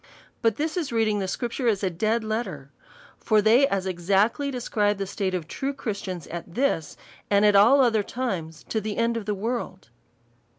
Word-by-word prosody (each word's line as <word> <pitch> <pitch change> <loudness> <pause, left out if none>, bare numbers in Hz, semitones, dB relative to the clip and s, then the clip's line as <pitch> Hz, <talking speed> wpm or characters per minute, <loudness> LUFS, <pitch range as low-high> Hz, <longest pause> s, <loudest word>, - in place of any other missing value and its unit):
But 225 -2 +2
this 310 +5 -2
is 320 -7 -2
read 225 -1 +2
ing 210 -1 0
the 190 - -2
Scripture 240 +5 -2
as 210 -3 +1
a 190 - +1
dead 220 +6 0
letter: 215 - -4 0.5
for 215 -1 +3
they 230 +6 +5
as 195 -6 -1
exactly 195 +9 +1
describe 210 -5 0
the 195 - -2
state 190 -1 -2
of 170 -3 -4
true 275 +9 -3
Christians 195 - -5
at 170 +1 -7
this, 250 - 0 0.3
and 205 +1 +4
all 230 +8 +7
other 225 -4 +3
times 185 -9 -4
to 220 - -1
the 210 0 -4
end 230 0 +1
of 220 -3 -4
the 210 - 0
world. 215 - -4
215 Hz, 185 wpm, -25 LUFS, 190-235 Hz, 0.5 s, all